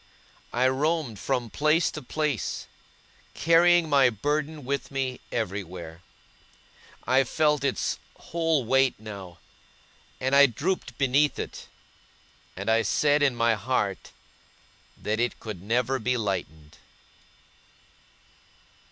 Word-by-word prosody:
I 125 +2 +2
roamed 140 - 0
from 125 -4 -2
place 155 +3 +2
to 150 - -7
place, 150 -2 -2 0.7
carrying 170 +1 +4
my 140 -4 +5
burden 145 +5 -2
with 140 0 -2
me 135 -2 -3
everywhere. 90 -6 -5 1.0
I 130 +1 +4
felt 150 +1 +1
its 135 -2 -1 0.2
whole 165 -5 0
weight 135 0 +2
now; 100 -5 -9 0.8
and 130 +1 +1
I 140 0 +8
drooped 135 - -3
beneath 140 +2 +2
it, - - -6 0.9
and 100 +2 -6
I 110 0 +4
said 145 +7 +2
in 140 -4 +3
my 115 -1 +3
heart 105 -3 -2 0.9
that 110 +1 -2
it 120 0 -1
could 105 -6 -7
never 125 +6 0
be 125 +2 0
lightened. 80 -8 -4
130 Hz, 110 wpm, -26 LUFS, 110-150 Hz, 1.0 s, I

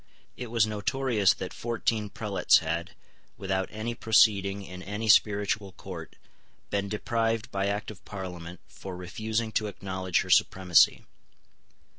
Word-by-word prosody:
It 125 - -6
was 115 -2 +3
notorious 110 0 +1
that - - -6
fourteen 115 -2 -2
prelates 105 -1 +3
had, 85 -1 -3 0.4
without 95 -1 -2
any 110 +2 -4
proceeding 100 -3 +3
in 90 0 -9
any 105 +4 -4
spiritual 105 -1 +3
court, - - -9 0.6
been 100 0 -1
deprived 115 +1 -1
by 100 0 -1
Act 100 +2 -2
of 95 -5 -14
Parliament 90 -3 -8
for 95 -1 -9
refusing 110 +5 -3
to 110 0 0
acknowledge 95 -3 -2
her - - -5
supremacy. 90 -3 +4
100 Hz, 130 wpm, -28 LUFS, 95-110 Hz, 0.6 s, supremacy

